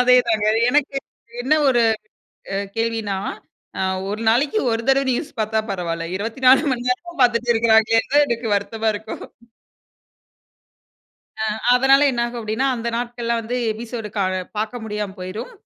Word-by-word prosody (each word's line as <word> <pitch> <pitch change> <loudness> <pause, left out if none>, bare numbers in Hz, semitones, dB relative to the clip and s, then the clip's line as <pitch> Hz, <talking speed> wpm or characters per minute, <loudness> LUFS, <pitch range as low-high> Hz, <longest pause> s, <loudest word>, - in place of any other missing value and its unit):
அதே 250 0 +6
தாங்க. 215 -2 +1 0.2
எனக்கு 290 0 +1 0.5
என்ன 285 +5 +3
ஒரு 240 -2 +3 0.7
அ - - 0 0.2
கேள்வின்னா, 225 -4 -1 0.6
அ - - +1 0.3
1 215 +2 -4
நாளைக்கு 280 - +2
ஒரு 225 0 -1
தடவை 270 0 +3
நியூஸ் 290 +5 -3
பாத்தா 220 0 +1
பரவால்ல. 165 -3 -3
24 255 +6 +3
மணி 245 0 -3
நேரமும் 340 +5 -3
பாத்துட்டு 240 0 +2
இருக்கறாங்களேன்னு 225 +1 +3
தான், 290 0 +6
எனக்கு 235 -1 -2
வருத்தமா 220 +2 -1
இருக்கும். 215 +2 -7 2.2
அ - - +1 0.3
அதனால 270 +2 +5
என்ன 240 -2 -1
ஆகும் 240 0 -7
அப்படீன்னா, 225 +4 -1
அந்த 235 0 -4
நாட்கள்ள 240 -1 -3
வந்து, 230 +2 -4 0.2
எபிசோடு 225 0 -6
க - - +1 0.4
பாக்க 215 +3 -2
முடியாம 210 -2 -4
போயிரும். 185 - -6
230 Hz, 140 wpm, -21 LUFS, 220-250 Hz, 2.2 s, அதே